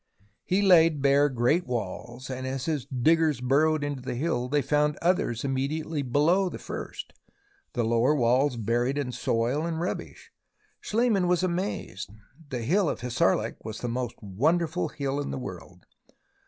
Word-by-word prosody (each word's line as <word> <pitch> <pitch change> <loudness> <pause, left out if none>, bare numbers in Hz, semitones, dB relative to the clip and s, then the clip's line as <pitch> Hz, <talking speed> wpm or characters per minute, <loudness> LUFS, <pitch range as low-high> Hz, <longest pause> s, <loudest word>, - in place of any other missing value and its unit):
He 195 +3 +1
laid 165 -6 +5
bare 140 +1 +4
great 130 +7 +1
walls, 120 +2 -5
and 130 0 -4
as 130 0 -3
his 150 -6 -2
diggers 155 +2 +2
burrowed 145 +4 +2
into 145 -2 -3
the 125 - -4
hill 125 -3 -1
they 145 0 +1
found 150 0 +1
others 170 -10 +1
immediately 145 +3 -2
below 155 +9 +2
the - - -7
first, - - -7 0.6
the 120 -5 0
lower 115 +6 +3
walls 125 +1 +2
buried 120 +5 0
in 140 -3 -2
soil 120 +5 0
and 165 -1 -2
rubbish. 175 - -5 0.5
Schliemann 215 -5 +1
was 180 0 +2
amazed. 180 - -3 0.4
The 125 -3 -3
Hill 180 - +2
of - - -4
Hissarlik 125 -1 0
was 110 0 -6
the 120 - -2
most 120 0 -3
wonderful 145 - 0
hill 140 -1 -3
in 145 - -3
the - - -3
world. 90 -6 -9
140 Hz, 155 wpm, -27 LUFS, 120-160 Hz, 0.6 s, laid